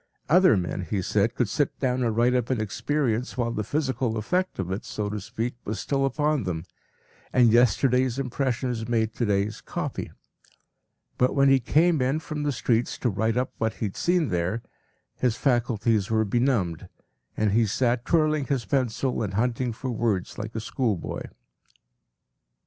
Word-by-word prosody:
Other 180 Hz, -, +5 dB
men, 90 Hz, +1 st, -2 dB
he 95 Hz, +2 st, -2 dB
said, 105 Hz, +6 st, +1 dB
could 125 Hz, -, +1 dB
sit 145 Hz, +7 st, -1 dB
down 130 Hz, -1 st, 0 dB
and 115 Hz, -2 st, 0 dB
write 120 Hz, +2 st, +4 dB
up 125 Hz, -2 st, 0 dB
an 130 Hz, -3 st, 0 dB
experience 115 Hz, +3 st, -1 dB
while 120 Hz, -2 st, 0 dB
the 110 Hz, -, -2 dB
physical 130 Hz, -4 st, -1 dB
effect 180 Hz, -, -1 dB
of 95 Hz, -1 st, -3 dB
it, 95 Hz, -, -3 dB
so 105 Hz, -1 st, -4 dB
to 105 Hz, -1 st, -4 dB
speak, 115 Hz, +5 st, -3 dB
was 105 Hz, +1 st, -4 dB
still 135 Hz, -1 st, 0 dB
upon 150 Hz, +1 st, 0 dB
them, 90 Hz, -5 st, -3 dB, 0.7 s
and 120 Hz, -3 st, +5 dB
yesterday’s 125 Hz, +2 st, +3 dB
impressions 125 Hz, -3 st, -2 dB
made 110 Hz, -2 st, +1 dB
to 120 Hz, -1 st, -1 dB
day’s 100 Hz, +1 st, 0 dB
“copy.” -, -, -4 dB, 1.1 s
But 125 Hz, -, +3 dB
when 140 Hz, -1 st, +5 dB
he 135 Hz, -1 st, +5 dB
came 155 Hz, +5 st, +3 dB
in 135 Hz, +5 st, +1 dB
from 155 Hz, -2 st, -5 dB
the 145 Hz, 0 st, 0 dB
streets 120 Hz, -2 st, 0 dB
to 120 Hz, -, 0 dB
write 110 Hz, +4 st, 0 dB
up 130 Hz, +1 st, -1 dB
what 110 Hz, 0 st, 0 dB
he -, -, -3 dB
had 100 Hz, -, -4 dB
seen 175 Hz, -4 st, +1 dB
there, 90 Hz, +6 st, -1 dB, 0.5 s
his 125 Hz, -3 st, +1 dB
faculties 115 Hz, -5 st, +1 dB
were 110 Hz, -1 st, +2 dB
benumbed, 105 Hz, -7 st, 0 dB, 0.5 s
and 105 Hz, -2 st, +2 dB
he 110 Hz, +2 st, +3 dB
sat 120 Hz, +2 st, +1 dB
twirling 155 Hz, -2 st, +2 dB
his 130 Hz, -3 st, -1 dB
pencil 130 Hz, -2 st, 0 dB
and 100 Hz, -3 st, -3 dB
hunting 120 Hz, +2 st, 0 dB
for 125 Hz, +3 st, -5 dB
words 110 Hz, -5 st, -1 dB
like 110 Hz, +1 st, -6 dB
a -, -, -1 dB
schoolboy. 110 Hz, -4 st, -2 dB
120 Hz, 170 wpm, -26 LUFS, 110-130 Hz, 1.1 s, Other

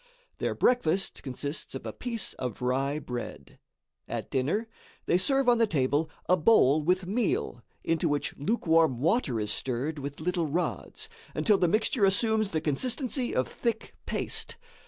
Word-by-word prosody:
Their -, -, -1 dB
breakfast 195 Hz, -6 st, +1 dB
consists 140 Hz, +3 st, -5 dB
of -, -, -6 dB
a -, -, -4 dB
piece 235 Hz, -4 st, -3 dB
of 125 Hz, -1 st, -4 dB
rye 135 Hz, +3 st, +1 dB
bread. 125 Hz, -5 st, -7 dB, 0.5 s
At -, -, -5 dB
dinner, 155 Hz, -, 0 dB, 0.4 s
they 175 Hz, -, +3 dB
serve 270 Hz, +6 st, +2 dB
on 240 Hz, -1 st, +5 dB
the 230 Hz, -, +4 dB
table 145 Hz, -1 st, +1 dB, 0.2 s
a 180 Hz, -, +5 dB
bowl 155 Hz, -, +5 dB
with 180 Hz, +4 st, +1 dB
meal 195 Hz, -, -1 dB, 0.2 s
into 165 Hz, 0 st, +1 dB
which 145 Hz, 0 st, -1 dB
lukewarm 160 Hz, -, +2 dB
water 155 Hz, -, +1 dB
is 105 Hz, -1 st, 0 dB
stirred 135 Hz, +5 st, -2 dB
with 140 Hz, 0 st, -6 dB
little 170 Hz, 0 st, 0 dB
rods 180 Hz, -, -3 dB, 0.3 s
until 210 Hz, -3 st, +3 dB
the 175 Hz, -, +3 dB
mixture 215 Hz, +4 st, +1 dB
assumes 215 Hz, +2 st, +3 dB
the 160 Hz, -4 st, -1 dB
consistency 250 Hz, -, -1 dB
of 130 Hz, -1 st, +1 dB
thick 230 Hz, -2 st, -3 dB
paste. -, -, -3 dB
165 Hz, 155 wpm, -28 LUFS, 140-220 Hz, 0.5 s, on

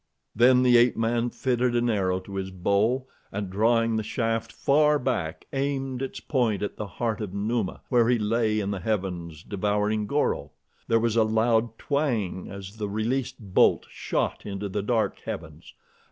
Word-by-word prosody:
Then 125 Hz, +2 st, +5 dB
the 125 Hz, -1 st, +6 dB
ape 120 Hz, +1 st, +4 dB
man 115 Hz, +1 st, +1 dB
fitted 125 Hz, -1 st, 0 dB
an 120 Hz, 0 st, +2 dB
arrow 95 Hz, -5 st, +1 dB
to 100 Hz, +1 st, -8 dB
his 95 Hz, 0 st, -3 dB
bow, 100 Hz, +8 st, +1 dB, 0.3 s
and 100 Hz, -2 st, -4 dB
drawing 115 Hz, +3 st, +2 dB
the -, -, 0 dB
shaft 115 Hz, 0 st, -2 dB
far 150 Hz, +1 st, +3 dB
back, 110 Hz, -, -2 dB
aimed 135 Hz, -2 st, -2 dB
its 135 Hz, -, -4 dB
point 115 Hz, -8 st, 0 dB
at 105 Hz, -, -3 dB
the 105 Hz, -, -5 dB
heart 110 Hz, +3 st, -2 dB
of 100 Hz, -2 st, -5 dB
Numa 105 Hz, 0 st, -1 dB
where 120 Hz, -2 st, +4 dB
he 125 Hz, -, +4 dB
lay 110 Hz, 0 st, +1 dB
in 100 Hz, -1 st, -2 dB
the 100 Hz, -, -3 dB
heavens 90 Hz, -5 st, -3 dB
devouring 105 Hz, +1 st, 0 dB
Goro. 145 Hz, +5 st, 0 dB, 0.3 s
There 115 Hz, -, +3 dB
was 115 Hz, -1 st, 0 dB
a 115 Hz, -, +6 dB
loud 110 Hz, +1 st, +1 dB
twang 120 Hz, -, -1 dB
as 100 Hz, +1 st, -9 dB
the 105 Hz, -2 st, -3 dB
released 125 Hz, +5 st, -1 dB, 0.2 s
bolt -, -, +4 dB
shot -, -, -2 dB
into 100 Hz, 0 st, -4 dB
the 100 Hz, +2 st, -2 dB
dark 110 Hz, +1 st, 0 dB
heavens. -, -, -7 dB
110 Hz, 170 wpm, -26 LUFS, 100-120 Hz, 0.3 s, the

